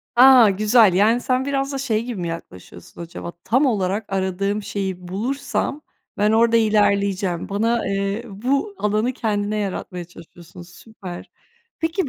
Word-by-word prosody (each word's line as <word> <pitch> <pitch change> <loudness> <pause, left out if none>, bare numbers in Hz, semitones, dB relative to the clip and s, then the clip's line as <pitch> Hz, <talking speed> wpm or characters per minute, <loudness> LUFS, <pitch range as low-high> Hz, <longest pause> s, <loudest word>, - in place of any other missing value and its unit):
A! 250 -3 +8
Güzel, 210 0 +4
yani, 220 +6 +3
sen 255 +1 0
biraz 275 0 -1
da - - -2
şey 230 -5 -1
gibi 235 -7 -5
mi 170 - -3
yaklaşıyorsun 165 - -9
acaba? 170 0 -7
Tam 260 +5 +2
olarak 205 -3 0
aradığım 195 +2 -1
şeyi 190 -3 -4
bulursam 270 +8 -3 0.4
ben 210 +1 +2
orada 230 +1 +4
ilerleyeceğim. 200 -4 +1
Bana, 225 +2 0
eee, 200 +3 -2
bu 270 - -2
alanı 215 +4 0
kendine 210 -2 -2
yaratmaya 185 -3 -4
çalışıyorsun, 175 +1 -14
süper. 180 +1 -11 0.5
Peki, 325 -1 -1
210 Hz, 140 wpm, -21 LUFS, 190-235 Hz, 0.5 s, A